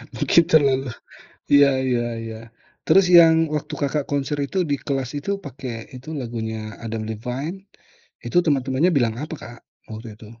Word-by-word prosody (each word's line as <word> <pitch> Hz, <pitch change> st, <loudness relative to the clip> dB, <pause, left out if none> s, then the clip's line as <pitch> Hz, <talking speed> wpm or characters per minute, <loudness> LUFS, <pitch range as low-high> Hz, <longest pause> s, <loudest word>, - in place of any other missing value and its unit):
Mungkin 170 Hz, -, +4 dB
terlalu 135 Hz, -4 st, +3 dB, 0.6 s
iya 140 Hz, -1 st, +7 dB, 0.2 s
iya 120 Hz, -2 st, +1 dB, 0.2 s
iya. 110 Hz, -1 st, -7 dB, 0.5 s
Terus 195 Hz, -1 st, +5 dB
yang 165 Hz, -1 st, +7 dB, 0.2 s
waktu 150 Hz, -, -3 dB
Kakak 145 Hz, +1 st, 0 dB
konser 145 Hz, 0 st, -1 dB
itu, 190 Hz, -, -3 dB
di 140 Hz, -, +2 dB
kelas 135 Hz, -3 st, -2 dB
itu, 145 Hz, -, -5 dB
pakai 130 Hz, -4 st, -7 dB
itu 125 Hz, +4 st, -12 dB
lagunya 115 Hz, -2 st, -4 dB, 0.3 s
Adam 110 Hz, -1 st, -4 dB
Levine, 125 Hz, -, -4 dB, 0.7 s
itu -, -, -1 dB
teman-temannya 140 Hz, +3 st, +2 dB
bilang 115 Hz, -4 st, +1 dB
apa, 155 Hz, +2 st, -6 dB
Kak, 120 Hz, +1 st, -10 dB, 0.3 s
waktu 110 Hz, 0 st, -8 dB
itu? 110 Hz, -, -13 dB
135 Hz, 150 wpm, -22 LUFS, 115-145 Hz, 0.7 s, iya